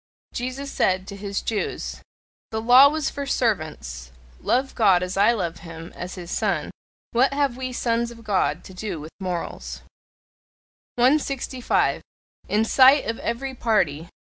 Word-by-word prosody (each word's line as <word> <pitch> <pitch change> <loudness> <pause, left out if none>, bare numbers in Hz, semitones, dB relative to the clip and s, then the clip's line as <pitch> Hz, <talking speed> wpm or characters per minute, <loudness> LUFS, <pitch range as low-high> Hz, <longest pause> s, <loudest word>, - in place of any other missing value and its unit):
Jesus 255 +3 -4
said 185 0 +1
to 200 - -7
his 200 0 -4
Jews: 220 -2 -3 0.5
"The 220 - -3
law 250 +5 +8
was 305 -1 -1
for 280 -1 -5
servants; 150 - -2 0.3
love 265 +2 0
God 190 -5 +4
as 180 +1 -4
I 200 +4 +5
love 175 -7 -2
him, 165 0 -10
as 180 +1 -6
his 175 -2 -8
Son! 185 -9 -1 0.4
What 265 +4 +3
have 280 -4 +1
we 255 0 -4
Sons 235 -1 0
of 230 -1 -12
God 205 -3 0
to 190 - -12
do 185 -3 -5
with 155 +2 -9
morals!" 180 -3 -5 1.1
165. 260 -1 +1 0.5
IN 215 +2 +2
SIGHT 265 +4 +6
OF 230 0 -3
EVERY 265 +3 -3
PARTY. 175 - 0
220 Hz, 145 wpm, -24 LUFS, 180-255 Hz, 1.1 s, law